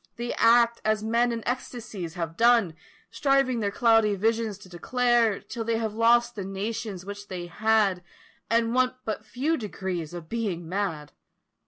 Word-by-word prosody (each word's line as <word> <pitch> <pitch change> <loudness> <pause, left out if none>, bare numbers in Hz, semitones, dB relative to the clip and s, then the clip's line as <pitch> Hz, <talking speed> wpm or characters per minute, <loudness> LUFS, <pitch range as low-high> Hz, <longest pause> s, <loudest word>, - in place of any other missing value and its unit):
They 240 +1 -4
act 235 0 +4
as 215 0 +1
men 235 +2 +2
in 230 -1 -4
ecstacies 220 -8 -5
have 165 -2 -4
done 230 -5 +4 0.4
Striving 275 -4 +2
their 205 -2 0
cloudy 225 -1 +3
visions 220 0 0
to 195 - -15
declare, 235 +4 +1
Till 230 - -6
they 230 0 0
have 220 -2 -2
lost 235 +2 +3
the 205 - -5
notions 195 0 -4
which 205 +1 -8
they 180 -2 -5
had, 205 0 +1 0.5
And 230 0 +2
want 255 0 +2
but 215 - -3
few 300 +6 -1
degrees 185 - -5
of 170 -2 -8
being 195 -7 -3
mad. 165 -6 -3
220 Hz, 160 wpm, -26 LUFS, 190-235 Hz, 0.5 s, act